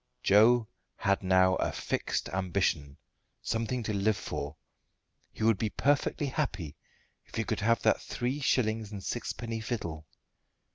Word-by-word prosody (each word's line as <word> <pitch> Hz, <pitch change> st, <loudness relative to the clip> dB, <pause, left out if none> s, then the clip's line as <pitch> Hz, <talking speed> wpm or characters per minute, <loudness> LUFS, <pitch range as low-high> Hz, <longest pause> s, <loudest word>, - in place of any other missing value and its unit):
Joe 110 Hz, +3 st, +5 dB, 0.3 s
had 100 Hz, 0 st, +1 dB
now 95 Hz, 0 st, +4 dB
a -, -, 0 dB
fixed -, -, -2 dB
ambition 85 Hz, -6 st, -1 dB, 0.5 s
something 115 Hz, +2 st, -1 dB
to 110 Hz, -, -2 dB
live 100 Hz, +1 st, +2 dB
for. 70 Hz, +2 st, -5 dB, 0.8 s
He -, -, -6 dB
would 110 Hz, -3 st, +4 dB
be 110 Hz, -, 0 dB
perfectly 145 Hz, +4 st, +1 dB
happy 105 Hz, -, -2 dB, 0.5 s
if -, -, -12 dB
he 110 Hz, -, 0 dB
could -, -, -2 dB
have 115 Hz, 0 st, +2 dB
that -, -, +3 dB
three 125 Hz, +4 st, -2 dB
shillings 110 Hz, -6 st, +1 dB
and 100 Hz, -2 st, -6 dB
sixpenny 115 Hz, -1 st, -3 dB
fiddle. 85 Hz, -10 st, -4 dB
110 Hz, 140 wpm, -30 LUFS, 95-115 Hz, 0.8 s, Joe